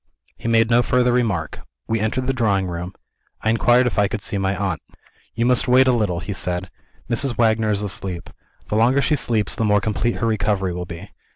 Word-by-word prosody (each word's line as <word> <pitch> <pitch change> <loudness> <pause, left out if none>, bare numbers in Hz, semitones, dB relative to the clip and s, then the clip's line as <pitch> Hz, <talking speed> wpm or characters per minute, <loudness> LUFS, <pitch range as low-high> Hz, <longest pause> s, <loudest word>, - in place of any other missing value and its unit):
He - - -7
made 115 0 +3
no 120 +1 +5
further 125 0 +2
remark. 120 -5 -1 0.3
We 115 - 0
entered 110 +5 -1
the 135 - 0
drawing 105 -6 +1
room. 90 +1 -6 0.5
I 110 - +2
inquired 120 +2 +3
if 125 - 0
I 100 - +3
could 105 +1 -5
see 100 - -1
my 95 0 0
aunt. 95 -1 -2 0.5
"You 115 - 0
must 125 +1 +3
wait 130 +1 +5
a - - +5
little," 105 -8 0
he 100 - -5
said. 90 -1 -2 0.4
"Mrs. 120 +1 0
Wagner 110 -1 +2
is 105 -1 0
asleep. 95 -3 -4 0.4
The - - -1
longer 125 +5 +3
she 150 - +2
sleeps 110 -6 0
the - - -1
more 105 -1 +3
complete 110 +3 -1
her - - -2
recovery 105 -4 0
will 90 0 -5
be. 85 +4 -9
110 Hz, 210 wpm, -21 LUFS, 100-120 Hz, 0.5 s, no